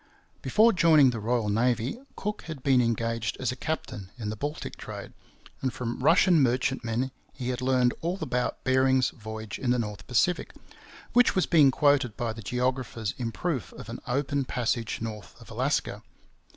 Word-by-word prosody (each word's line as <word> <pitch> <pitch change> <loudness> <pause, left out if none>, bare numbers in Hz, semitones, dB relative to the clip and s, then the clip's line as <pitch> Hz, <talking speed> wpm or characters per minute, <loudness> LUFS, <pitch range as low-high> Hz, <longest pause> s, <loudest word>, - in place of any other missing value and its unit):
Before 225 +2 +4
joining 160 -7 +6
the 115 - -4
Royal 115 0 0
Navy, 120 - 0 0.2
Cook 210 +1 -4
had 155 -6 -7
been 130 -3 +4
engaged 115 -2 -1
as 130 -2 0
a - - -5
captain 125 - -4
in 105 -3 -4
the - - -4
Baltic 145 +7 -5
trade; - - -8 0.5
and 130 - 0
from 120 -1 -4
Russian 165 +4 +5
merchantmen 125 -1 0 0.2
he 125 -1 -4
had 125 0 -2
learned 125 -1 +3
all 175 +3 -1
about 125 -7 -2
Bering's 130 -1 +3
voyage 110 -2 -7
in 130 - -1
the 125 - +3
North 105 -4 -4
Pacific, 170 +8 +1 0.6
which 245 0 +5
was 185 - +3
being 150 -5 +6
quoted 140 -4 +2
by 115 -2 -2
the 115 - -9
geographers 125 -1 -2
in 115 -2 -2
proof 145 -1 -3
of 110 - -10
an 115 - -6
open 140 +2 0
passage 120 -2 -1
north 105 -3 -7
of - - -14
Alaska. - - -1
125 Hz, 170 wpm, -27 LUFS, 115-140 Hz, 0.6 s, joining